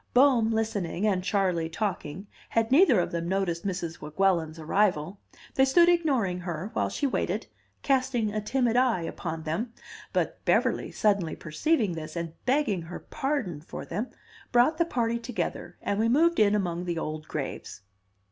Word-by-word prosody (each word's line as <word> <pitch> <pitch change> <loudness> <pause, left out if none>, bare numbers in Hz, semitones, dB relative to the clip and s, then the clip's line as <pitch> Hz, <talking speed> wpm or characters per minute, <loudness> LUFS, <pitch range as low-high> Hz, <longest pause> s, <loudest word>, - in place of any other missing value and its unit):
Bohm, 250 -4 +5
listening, 210 -4 -1
and 190 -4 +1
Charley, 185 -4 +1
talking, 185 -2 -3 0.2
had 225 0 +1
neither 275 - +6
of 175 - -1
them 170 0 -2
noticed 190 -1 -1
Mrs. 175 -4 -4
Weguelin's 165 0 +1
arrival; 180 +1 0 0.3
they 265 - +4
stood 340 +6 +5
ignoring 270 - +2
her, 180 +3 -5
while - - 0
she 290 - -2
waited, 270 - -1 0.4
casting 255 -6 +1
a 215 - -1
timid 240 +1 +1
eye 245 -8 +3
upon 160 -1 -5
them. 205 +10 -3 0.4
But - - -1
Beverly, - - +2
suddenly 200 -6 +1
perceiving 210 - 0
this, 160 -1 -6
and 170 -1 -4
begging 255 - +2
her 165 +2 -7
pardon 270 - -3
for 160 - -8
them, 210 +9 -3 0.4
brought 250 +7 +4
the 340 - +4
party 235 -7 0
together, 235 0 -4
and 200 - -1
we 225 +1 +3
moved 330 +7 +4
in 210 -1 +5
among 180 -3 -1
the 170 -1 -2
old 155 -1 -4
graves. 140 -7 -5
200 Hz, 160 wpm, -27 LUFS, 170-245 Hz, 0.4 s, neither